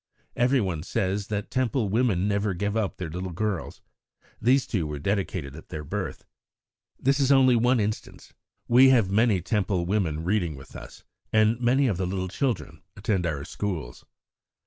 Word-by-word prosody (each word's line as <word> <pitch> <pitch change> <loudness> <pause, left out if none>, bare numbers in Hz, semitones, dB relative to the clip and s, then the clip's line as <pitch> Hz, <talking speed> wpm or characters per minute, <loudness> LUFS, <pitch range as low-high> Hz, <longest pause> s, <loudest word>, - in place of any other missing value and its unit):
Everyone 120 - +1
says 100 +4 -2
that 105 -1 -4
Temple 130 -3 0
women 105 -4 +1
never 100 -1 0
give 100 +3 -2
up 110 -4 -1
their 90 -4 -5
little 90 +2 -4
girls. 95 +1 -3 0.6
These 130 +4 +3
two 90 -9 -2
were 75 -1 -4
dedicated 95 -4 -2
at 80 - -12
their 75 -4 -5
birth. 75 - -5 0.7
This 135 +2 +2
is 140 0 +3
only 130 -2 +6
one 120 +2 +3
instance. 105 0 -4 0.3
We 130 +3 +7
have 115 -7 +4
many 105 -2 +3
Temple 95 -2 0
women 85 -5 -1
reading 90 -4 0
with 65 - -13
us, - - -11 0.3
and 110 +2 +3
many 130 +3 +3
of 105 -9 +1
the 95 -1 -1
little 95 0 -3
children 125 +5 -2 0.2
attend 100 -4 0
our 70 -3 -3
schools." 85 -13 -5
100 Hz, 165 wpm, -26 LUFS, 90-120 Hz, 0.7 s, We